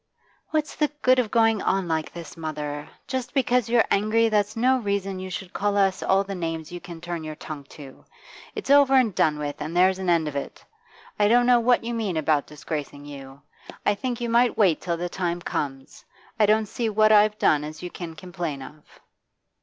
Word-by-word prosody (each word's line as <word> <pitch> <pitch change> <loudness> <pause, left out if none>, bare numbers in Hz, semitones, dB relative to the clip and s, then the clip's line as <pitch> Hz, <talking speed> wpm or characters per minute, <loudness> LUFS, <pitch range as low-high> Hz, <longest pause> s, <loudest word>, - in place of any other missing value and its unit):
'What's 310 -1 -1
the 300 - +2 0.2
good 255 0 +5
of 235 -4 0
going 225 -2 +3
on 190 -1 0
like 160 -1 -2
this, 170 -1 -9
mother? 150 -2 -5 0.2
Just 260 0 -4
because 250 -3 +2
you're 235 -1 +4
angry, 215 +3 +3
that's 210 +1 0
no 255 +3 +3
reason 200 -3 -2
you 185 0 -6
should 185 0 -6
call 205 0 0
us 195 -1 +2
all 195 +1 +2
the 200 0 -6
names 165 -3 -4
you 175 0 -7
can 170 -2 -9
turn 175 -1 -5
your 155 -1 -6
tongue 150 -2 -8
to. 140 -2 -13 0.5
It's 420 -10 -3
over 280 -1 +6
and 245 -6 +4
done 155 -2 +2
with, 145 -1 -5
and 155 +3 -4
there's 185 +1 +4
an 185 -2 -2
end 165 -2 +2
of 150 - -5
it. 140 - -6 0.5
I 205 - +5
don't 240 +3 +4
know 245 -1 +5
what 240 +1 +3
you 235 +1 -3
mean 210 -7 -2
about 155 -2 +1
disgracing 145 -1 -6
you; 140 -1 -11 0.4
I 205 - +4
think 245 +3 -4
you 240 - -2
might 235 +1 +3
wait 190 -7 +3
till 170 -2 -2
the 175 +1 -3
time 175 -1 -2
comes. 135 -5 -5 0.4
I 210 - +5
don't 215 +1 +3
see 225 +2 -2
what 215 0 +4
I've 210 0 +5
done 150 -7 +3
as 155 +3 -8
you 180 - -5
can 165 -2 -7
complain 170 -6 -5
of. 150 +3 -12
190 Hz, 210 wpm, -25 LUFS, 155-225 Hz, 0.5 s, over